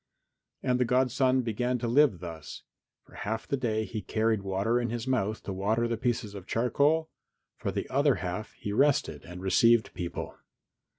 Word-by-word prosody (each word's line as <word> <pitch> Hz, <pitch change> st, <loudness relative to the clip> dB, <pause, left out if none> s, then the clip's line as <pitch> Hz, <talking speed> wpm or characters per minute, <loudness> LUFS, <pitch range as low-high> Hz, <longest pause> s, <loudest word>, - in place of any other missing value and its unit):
And 125 Hz, 0 st, +1 dB
the -, -, +4 dB
godson 130 Hz, +1 st, +2 dB
began 120 Hz, +2 st, -1 dB
to 120 Hz, -, -3 dB
live 120 Hz, -, +4 dB
thus 80 Hz, -3 st, -8 dB, 0.4 s
for -, -, -21 dB
half 110 Hz, +2 st, -4 dB
the -, -, 0 dB
day 110 Hz, -4 st, -1 dB
he 110 Hz, -1 st, -5 dB
carried 110 Hz, -1 st, 0 dB
water 100 Hz, +5 st, 0 dB
in 120 Hz, -, -2 dB
his 120 Hz, +1 st, -3 dB
mouth 110 Hz, -5 st, 0 dB
to 100 Hz, -, -4 dB
water 110 Hz, +5 st, +1 dB
the 115 Hz, -, -1 dB
pieces 115 Hz, -3 st, -1 dB
of 95 Hz, -2 st, -9 dB
charcoal, 145 Hz, +7 st, +2 dB, 0.4 s
for -, -, -3 dB
the -, -, -3 dB
other 140 Hz, +1 st, +3 dB
half 90 Hz, +3 st, -4 dB
he 100 Hz, -, -5 dB
rested 140 Hz, +4 st, +2 dB
and 90 Hz, +1 st, -9 dB
received 115 Hz, +4 st, +4 dB
people. 85 Hz, -1 st, -5 dB
115 Hz, 175 wpm, -29 LUFS, 100-125 Hz, 0.4 s, the